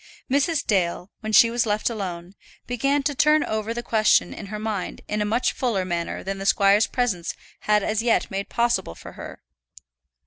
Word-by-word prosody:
Mrs. 285 +3 +1
Dale, 180 -2 0
when 220 - -5
she 230 +2 +6
was 235 -1 0
left 210 0 0
alone, 185 -5 -4 0.3
began 275 +4 0
to 290 - 0
turn 300 +2 +4
over 220 0 -3
the 240 +1 -4
question 220 -2 +3
in 205 - -8
her 210 +2 -5
mind 210 -3 -4
in 210 0 -2
a - - +1
much 230 +4 +1
fuller 220 -8 -1
manner 170 -2 -3
than 195 +1 -4
the 195 - -5
squire's 200 +2 +4
presence 210 -9 -2 0.3
had 210 -1 +4
as 215 +1 0
yet 235 -1 +1
made 195 +1 -4
possible 235 - 0
for - - -11
her. - - -10
215 Hz, 185 wpm, -24 LUFS, 195-240 Hz, 0.3 s, she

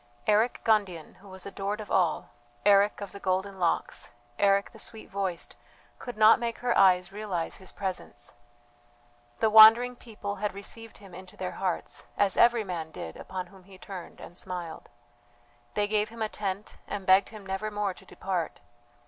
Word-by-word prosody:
Eric 220 +3 +2
Gundian, 195 -8 0
who 200 +1 -16
was 190 -1 -10
adored 200 +1 -4
of 210 - -8
all 175 -4 +1 0.3
Eric 205 +1 +4
of 200 -2 -6
the 200 - -9
golden 190 +1 -1
locks, 170 -2 -1 0.3
Eric 200 0 +3
the - - -13
sweet 220 -2 -7
voiced, 190 -3 -3 0.4
could 245 -3 -7
not 215 +1 +7
make 235 -1 -3
her 245 -1 0
eyes 180 -1 +4
realize 200 -5 -3
his 190 - -9
presence. 180 -11 -6 1.1
The 220 - +4
wandering 225 +3 +9
people 210 -4 -7
had 210 0 -2
received 225 +3 -8
him 195 -3 -15
into 185 +1 -12
their 185 -1 -3
hearts, 185 -3 -4
as 200 -2 +2
every 235 -1 +5
man 170 -5 -5
did 80 - -8
upon 185 -1 -6
whom 185 0 -18
he 195 -1 -14
turned 185 -2 -9
and 175 - -11
smiled. 175 -3 -6 0.9
They 205 0 +1
gave 210 0 +1
him 230 0 -5
a 215 - -1
tent 200 0 -5
and 200 -2 -5
begged 190 +1 +5
him 215 -3 -11
never 195 +3 -3
more 205 -2 -2
to - - -16
depart. 180 -4 -4
200 Hz, 175 wpm, -28 LUFS, 185-215 Hz, 1.1 s, wandering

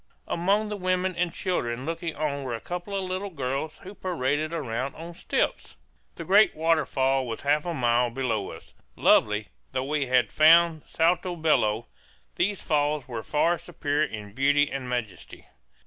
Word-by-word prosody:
Among 200 +5 +1
the 210 - -3
women 185 -1 0
and 175 0 0
children 130 -9 -2
looking 165 0 -3
on 145 -2 -2
were 130 -3 -3
a - - -6
couple 180 - -5
of 195 - -1
little 185 +2 -3
girls 140 -1 -3
who 190 - -9
paraded 155 -5 -1
about 135 -4 -3
on 170 +2 -8
stilts. 165 - -2 0.4
The 165 - -7
great 205 +5 +5
waterfall 135 -5 +1
was 115 - -5
half 150 +3 +1
a 170 - -1
mile 120 -2 +2
below 115 -5 -2
us. - - -12 0.2
Lovely 105 0 +3 0.2
though 130 - -1
we 145 0 -1
had 125 -1 +2
found 165 +1 +5
Salto 175 +2 +1
Bello, 120 -9 +1 0.5
these 200 +1 0
falls 150 -2 0
were 120 -3 -5
far 165 +7 +1
superior 155 -3 -1
in 105 -4 -8
beauty 145 +3 +3
and 130 -2 -4
majesty. 115 -6 -5
150 Hz, 165 wpm, -26 LUFS, 130-170 Hz, 0.5 s, great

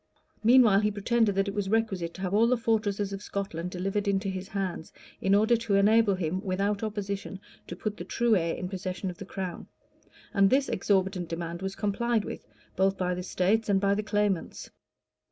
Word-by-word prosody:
Meanwhile 230 -4 +6
he 210 0 +2
pretended 210 0 +1
that 195 +1 +1
it 200 - -3
was 200 -2 -2
requisite 195 -6 0
to 190 - -9
have 190 0 -2
all 220 +3 +4
the 250 +1 +2
fortresses 210 -3 0
of 195 - -5
Scotland 195 -4 -4
delivered 195 +3 -2
into 195 0 0
his 190 0 -5
hands, 195 -6 -4 0.3
in 195 +1 +3
order 220 +3 +4
to 225 -3 -1
enable 210 +1 +4
him, 185 +1 -2
without 200 +1 -1
opposition, 200 -3 -4 0.3
to 175 - -6
put 210 +3 -4
the - - -6
true 230 +4 +2
heir 165 -3 0
in 180 - -4
possession 185 0 -4
of 175 - -14
the 195 - -7
crown; 190 -2 -6 0.7
and 195 -1 +5
this 270 +3 +2
exorbitant 190 -2 0
demand 170 +1 -4
was 190 0 -4
complied 220 +2 0
with, - - -7 0.3
both 190 +1 +2
by 180 -1 0
the 180 - -4
states 195 +5 0
and 195 -1 +4
by 200 0 +2
the 205 - 0
claimants. 205 -4 -1
195 Hz, 195 wpm, -28 LUFS, 185-210 Hz, 0.7 s, Meanwhile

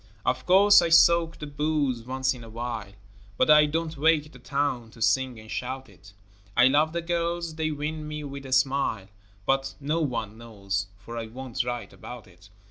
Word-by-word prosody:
Of 130 0 -1
course 200 +2 +7
I 170 - 0
soak 170 0 +5
the 150 - -6
booze 145 -4 -1
once 130 +1 0
in 125 -2 -11
a 115 - -11
while, 115 -3 -5 0.4
But - - +4
I 150 0 +7
don't 160 +1 -2
wake 155 0 +2
the 125 - -14
town 130 -3 -2
to 115 - -17
sing 120 +2 +1
and 110 0 -12
shout 130 +1 -4
it; 100 0 -18 0.4
I 125 - +7
love 150 +3 +3
the 170 0 -3
girls, 170 -1 -2
they 155 0 -2
win 150 +1 -4
me 150 0 -5
with 140 -1 -7
a - - -10
smile, 130 -6 +1 0.4
But 135 0 0
no 150 +4 -1
one 115 -6 -3
knows, 100 -4 -4
for 115 +4 -7
I 115 - -5
won't 125 +2 -4
write 120 -5 -5
about 115 +5 -10
it. 90 0 -19
135 Hz, 195 wpm, -26 LUFS, 115-155 Hz, 0.4 s, course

